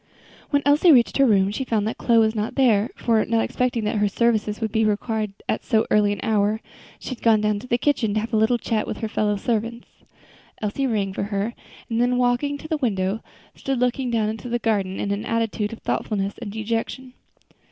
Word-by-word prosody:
When 285 -1 +1
Elsie 295 +4 +5
reached 245 -5 +4
her 275 -1 +5
room, 195 -3 +3
she 265 - -3
found 220 -4 0
that 220 - -4
Chloe 235 -1 +3
was 220 -1 +4
not 215 0 -3
there; 230 -5 +3
for, 225 -2 +2
not 225 -1 +1
expecting 250 -3 -1
that 210 +1 -1
her 205 0 +2
services 215 0 0
would 220 -2 -2
be 220 -1 +2
required 215 0 -1 0.2
at - - -1
so 220 -3 +2
early 210 -1 +4
an 205 - -3
hour, 215 0 +1 0.4
she - - -8
had 255 - -6
gone 225 -2 +4
down 210 -1 0
to 255 - -11
the 240 - +2
kitchen 245 -6 +1
to - - +2
have 225 +2 -5
a - - +3
little 220 +3 +3
chat 225 -2 -2
with - - -4
her 220 - -3
fellow 210 -1 0
servants. 230 +2 -2 0.7
Elsie 220 +6 -1
rang 200 -5 -1
for 200 - -2
her, 205 +2 -2 0.3
and 230 0 0
then 245 0 +2
walking 250 +4 +1
to 315 - -10
the 315 - -1
window, 200 -5 -1 0.3
stood 270 -2 -3
looking 250 +1 0
down 225 -3 +1
into 220 +3 -5
the 240 - +1
garden 200 -5 -1
in 200 - -2
an 200 +1 -2
attitude 225 -2 -1
of 230 - -7
thoughtfulness 200 -2 -2
and 225 -4 -6
dejection. 230 +4 -3
225 Hz, 220 wpm, -23 LUFS, 210-245 Hz, 0.7 s, Elsie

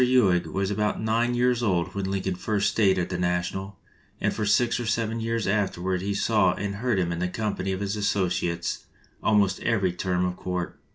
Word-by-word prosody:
Ewing 110 -9 +3
was 95 +1 -1
about 105 +1 0
nine 115 +2 +1
years 125 0 +2
old 95 -5 0
when 100 -1 -2
Lincoln 95 -1 -1
first 100 +2 0
stayed 95 -4 +3
at 90 - -1
the 90 -1 -3
National, 90 +2 -2 0.4
and - - 0
for 110 -2 -2
six 120 +4 +3
or 120 - -3
seven 115 +1 0
years 115 -1 -1
after 100 -2 0
ward 90 0 -1
he 100 +1 -2
saw 100 -4 +3
and 100 0 -3
heard 120 -1 0
him 85 -2 0
in 85 - -3
the 90 - 0
company 100 -2 -2
of 95 +1 -3
his 100 +1 -1
associates 90 -4 -1 0.4
almost 100 -3 +3
every 100 -6 +1
term 90 0 0
of 90 0 -2
court. 90 -1 -4
100 Hz, 205 wpm, -26 LUFS, 90-110 Hz, 0.4 s, Ewing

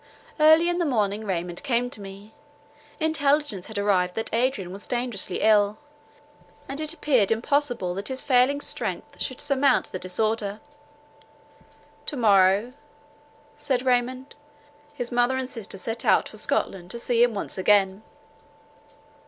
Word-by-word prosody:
Early 315 +2 +6
in 350 0 0
the 345 - +1
morning 215 -5 0
Raymond 175 -2 -3
came 245 -2 0
to 210 - -7
me; 200 +2 -11 0.7
intelligence 290 - 0
had 220 - -7
arrived 185 -3 +1
that 225 - -4
Adrian 230 -6 0
was 195 +2 -8
dangerously 240 -7 -2
ill, 210 -1 +4 0.9
and 275 +3 -4
it 310 -1 -2
appeared 265 -11 +1
impossible 245 -4 0
that 195 +3 -5
his 260 0 -1
failing 265 +1 +3
strength - - -5
should 255 - -3
surmount 275 -2 +1
the 185 - -5
disorder. 210 +3 -2 1.5
"To 295 - -4
morrow," 205 +1 +4 0.8
said 260 -3 -1
Raymond, 255 +2 0 0.6
"his 245 -4 -4
mother 245 +2 +2
and 260 -1 -2
sister 225 -6 -7
set 225 +4 -5
out - - +3
for - - -11
Scotland 180 -2 -2
to 235 - -6
see 235 0 0
him 240 -2 +3
once 200 - -4
again." 195 0 +3
235 Hz, 140 wpm, -25 LUFS, 200-260 Hz, 1.5 s, Early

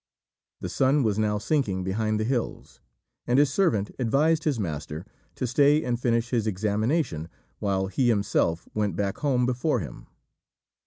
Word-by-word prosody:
The - - -3
sun 135 +2 +2
was 110 -2 +1
now 105 -1 +1
sinking 105 -5 0
behind 110 +3 -1
the - - 0
hills, 120 0 -3 0.5
and 120 - +3
his 140 -1 +4
servant 110 - +1
advised 150 +6 +2
his 145 -7 +1
master 80 -3 -4 0.3
to - - -2
stay 145 +5 +4
and 120 -1 -1
finish 115 -1 +1
his 115 -3 +1
examination 105 - -1 0.3
while 95 -2 0
he 110 +6 +1
himself 100 -6 +1
went 105 -4 -1
back 100 -1 -2
home 130 -4 +1
before 125 +2 0
him. 70 - -8
110 Hz, 155 wpm, -26 LUFS, 100-130 Hz, 0.5 s, his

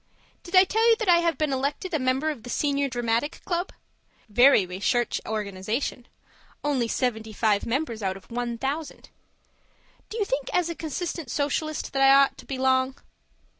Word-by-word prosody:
Did 355 +1 -5
I 370 - +9
tell 445 +4 +2
you 455 - +6
that 440 -2 -4
I 350 -1 +7
have 340 -1 +1
been 305 -3 0
elected 280 +7 -2
a 315 - +1
member 260 +4 +1
of 280 -7 -8
the 245 - -10
Senior 280 +1 0
Dramatic 240 +4 -1
Club? 350 0 -2 0.6
Very 245 -1 +6
recherche 200 +6 -1
organization. 215 +4 -3 0.6
Only 275 -5 0
seventy 220 -2 -2
five 210 -1 +1
members 235 -2 -2
out 190 -1 -2
of 195 - -18
one 240 0 -3
thousand. 285 +5 -4 1.0
Do 445 - -6
you 420 - +1
think 270 -5 -2
as 355 -2 +1
a 335 - -4
consistent 325 -2 -4
Socialist 300 +3 -2
that 270 - 0
I 270 0 +7
ought 275 0 +4
to - - -13
belong? 260 0 +1
270 Hz, 170 wpm, -25 LUFS, 235-315 Hz, 1.0 s, I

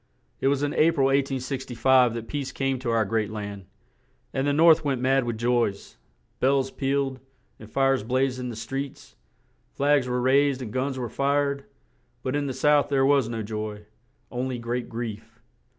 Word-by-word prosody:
It - - +1
was 140 +1 +1
in 145 - 0
A 155 - +4
pril, 135 -4 +2
1865, 130 -2 +2
that 115 -1 -5
peace 140 0 -4
came 135 -1 -1
to 125 -1 -3
our 115 -1 +2
great 110 +1 -1
land; 100 -2 -6 0.7
and 135 +1 0
the - - +3
North 160 +2 +5
went 135 -4 0
mad 135 0 +2
with 120 -2 -3
joys; 120 -4 -1 0.4
bells 135 0 +2
pealed, 135 -1 -1 0.4
and 110 - -12
fires 135 +2 +2
blazed 130 +3 0
in 125 -1 -4
the 115 - -6
streets; 135 +5 -6 0.6
flags 140 -2 +2
were 125 0 -1
raised 135 +2 +3
and 115 -4 -6
guns 130 +1 -1
were 125 -2 -3
fired; 140 +2 0 0.6
but 130 +1 -2
in 145 -1 -1
the 135 - -3
South 150 +2 +3
there 135 -2 +3
was 135 -4 +3
no 115 -2 -3
joy; 105 0 -5 0.5
on 125 +1 -2
ly 125 - -3
great 120 +1 -3
grief. 110 -1 -6
130 Hz, 180 wpm, -25 LUFS, 115-140 Hz, 0.7 s, North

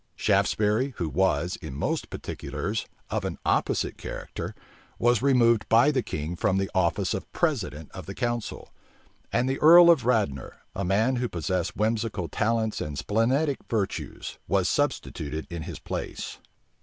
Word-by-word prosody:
Shaftesbury, 110 +5 +1
who 85 - -1
was, 90 +1 +1
in 65 - -8
most - - -2
particulars, - - -4 0.2
of - - -1
an - - -3
opposite - - 0
character, - - -6 0.4
was 120 -1 +3
removed 120 -5 +3
by 120 +6 +6
the 135 -3 +1
king 80 -4 -4
from 95 +2 +1
the 95 0 -1
office 90 -4 +1
of - - -5
president 75 0 -1
of - - -9
the 95 - -6
council; 120 -2 -3 0.6
and 125 - +1
the 135 +1 -1
earl 170 +2 +9
of 150 -7 +3
Radnor, 100 - 0 0.2
a 100 - -2
man 110 +8 +2
who 120 0 -1
possessed 90 +1 -2
whimsical 110 -4 0
talents 110 +4 0
and 75 -1 -4
splenetic 125 - +1
virtues, 105 -4 -3
was - - +2
substituted 75 +1 -1
in 85 -1 -4
his 85 0 -6
place. - - -5
105 Hz, 150 wpm, -26 LUFS, 90-120 Hz, 0.6 s, earl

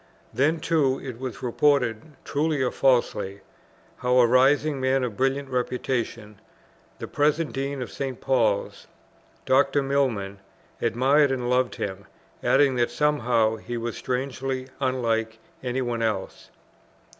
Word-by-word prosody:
Then 155 +5 +2
too 150 -5 +1
it 125 -4 -7
was 130 0 -6
reported, 125 -3 +2 0.2
truly 150 +1 0
or 125 - 0
falsely, 110 -7 +1 0.6
how 125 0 +1
a 125 - +7
rising 135 +4 +3
man 130 0 +2
of 120 -4 -3
brilliant 135 +3 0
reputation, 120 -4 -3 0.6
the - - -6
present 150 +2 +1
Dean 135 -1 -3
of 120 - -9
St. 135 -3 -4
Paul's, 115 -6 0 0.6
Dr. 135 +1 +3
Milman, 120 -8 -1 0.4
admired 140 +4 +3
and 125 -2 -1
loved 125 0 +1
him, 100 0 -5 0.4
adding, 135 -2 +3
that 120 -1 +2
somehow 120 -5 +1
he 120 +2 -6
was 115 0 -4
strangely 130 0 -3
unlike 115 -4 -1 0.2
any 130 +1 -2
one 120 -1 -2
else. 105 -4 -3
130 Hz, 130 wpm, -25 LUFS, 115-135 Hz, 0.6 s, a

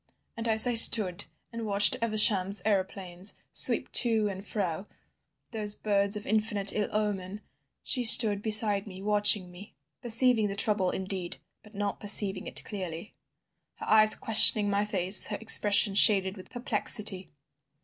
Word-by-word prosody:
And 230 -1 -9
as 220 0 +5
I 245 - -4
stood 215 -5 +4 0.3
and 230 0 -10
watched 205 -1 +2
Evesham's 205 -4 -1
aeroplanes 190 -2 -3 0.2
sweep - - +1
to 225 -4 +1
and 190 0 -11
fro—those 205 +2 -9
birds 200 -1 -2
of 210 - -11
infinite 210 -2 -1
ill 210 -1 -6
omen—she 210 +5 -8
stood 215 -3 +4
beside 210 -1 0
me 190 -1 -14
watching 205 -3 -1
me, 180 +3 -18 0.3
perceiving 235 -2 -1
the 195 - -9
trouble 200 -2 0
indeed, 190 -2 -8 0.2
but 215 0 -22
not 205 0 -8
perceiving 200 -1 +4
it - - -6
clearly—her 185 -3 -15
eyes 215 0 +3
questioning 215 -2 +3
my 200 +1 -4
face, 190 -1 +3
her 210 - -8
expression 205 -2 +2
shaded 195 -2 +2
with 185 - -17
perplexity. 210 -5 -2
205 Hz, 135 wpm, -24 LUFS, 195-215 Hz, 0.3 s, as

